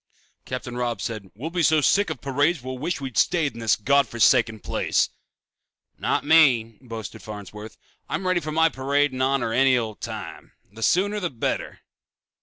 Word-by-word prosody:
Captain 125 -1 -5
Robb 120 -3 -2
said, 105 -1 -5
"We'll 145 +10 -6
be 175 0 -1
so 160 0 +4
sick 200 +7 +3
of 155 -5 -5
parades 140 +2 0
we'll 130 0 -6
wish 175 +6 -2
we'd 130 -5 -2
stayed 160 -5 +2
in 115 - -10
this 115 -3 +2
God 140 +4 +2
forsaken 115 -1 +3
place." - - 0 0.9
"Not - - 0
me," 125 -9 +4
boasted 115 -5 -8
Farnsworth. 105 +1 -9 0.3
"I'm 190 - -3
ready 185 -1 +2
for 155 - -6
a 160 +1 +3
parade 140 +2 +1
in 130 - -6
my 130 - +3
honor 135 -4 0
any 130 +1 +4
old 110 -3 -4
time. - - -7 0.2
The 110 +2 -12
sooner 200 - +2
the 180 -4 -2
better." 120 -6 -3
130 Hz, 180 wpm, -24 LUFS, 115-155 Hz, 0.9 s, so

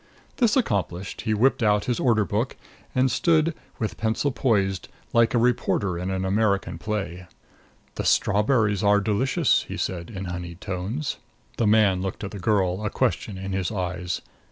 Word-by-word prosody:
This 235 -1 +3
accomplished, 95 - -1
he 110 - 0
whipped 130 +4 +3
out 105 -2 +3
his 120 -2 -1
order 110 -4 +3
book, 110 +6 -2 0.4
and 130 0 +3
stood 165 +3 +2 0.2
with 110 - -3
pencil 115 +6 0
poised, 100 -8 0 0.3
like 115 0 +4
a - - +5
reporter 115 -5 +1
in 90 +1 -3
an 95 0 -1
American 100 0 +1
play. 95 -5 -4 0.7
"The - - -4
strawberries 105 -1 +2
are 105 0 +5
delicious," 130 - +2
he - - -5
said 85 -2 -3
in 95 -4 -6
honeyed 90 -1 -6
tones. 105 +8 -3 0.4
The 115 - +2
man 105 -3 +4
looked 95 +1 -4
at 100 - -4
the 100 - -7
girl, 95 0 +1
a 105 - 0
question 100 -1 -1
in 95 +1 -5
his 95 0 -1
eyes. 90 -3 -3
105 Hz, 165 wpm, -25 LUFS, 95-115 Hz, 0.7 s, a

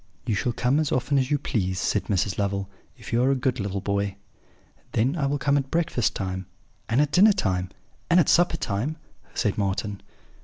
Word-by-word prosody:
"'You 115 - 0
shall 120 +4 0
come 125 +5 +1
as 155 -2 0
often 135 +3 +1
as 130 0 0
you 145 - +2
please,' 95 -9 -1
said - - 0
Mrs. 95 0 0
Lovel, 100 -1 -1 0.3
'if - - -9
you 120 - +3
are 130 - +3
a 135 - +3
good 130 -1 -1
little 100 -1 -2
boy.' 100 0 -1 0.8
"'Then 130 +8 +2
I 145 -5 0
will 145 +1 0
come 140 +1 +2
at 135 -1 -5
breakfast 165 -8 0
time, 95 -1 -4 0.4
and 115 +4 +2
at 150 0 +2
dinner 205 +5 +6
time, 95 - -1 0.4
and 175 +1 +6
at 165 - +3
supper 175 -1 +4
time,' 120 +9 -2 0.4
said 105 -3 0
Marten. 100 +1 -2
120 Hz, 200 wpm, -25 LUFS, 100-145 Hz, 0.8 s, dinner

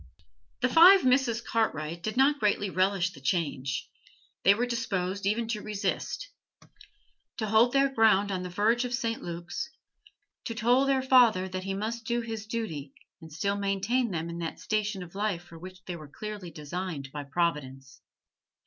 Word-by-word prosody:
The - - +3
five 360 +2 +8
Misses 250 -3 +3
Cartwright 170 -9 -1
did 215 +5 -4
not 285 +2 +4
greatly 205 -3 +1
relish 185 0 +1
the 135 - -14
change; 135 -4 -1 0.5
they 200 - +6
were 240 +3 0
disposed 200 -5 -2
even 225 +3 0
to 215 -2 -2
resist, 210 - -3 1.1
to 220 - -1
hold 220 +3 +4
their 275 0 +4
ground 210 -4 +4
on 185 -1 -2
the 180 - -5
verge 220 +7 +2
of 250 0 -1
St. 230 -2 -2
Luke's, 170 - -5 0.8
to 230 - -4
toll 245 +4 +3
their 270 -1 +2
father 240 -8 +5
that 185 0 -5
he 195 0 -2
must 225 +3 -4
do 235 +1 0
his 225 -2 -6
duty 160 - -4 0.3
and 160 -1 -12
still 200 +6 -1
maintain 200 +5 0
them 165 -3 -3
in 170 0 -6
that 165 -1 -4
station 210 -3 -1
of 170 - -13
life 200 -3 -2
for 165 -2 -13
which 185 +1 -11
they 180 - -5
were 155 -3 -10
clearly 205 +4 -7
designed 155 -2 -5
by 145 0 -5
Providence. 140 -3 -3
200 Hz, 170 wpm, -28 LUFS, 170-230 Hz, 1.1 s, five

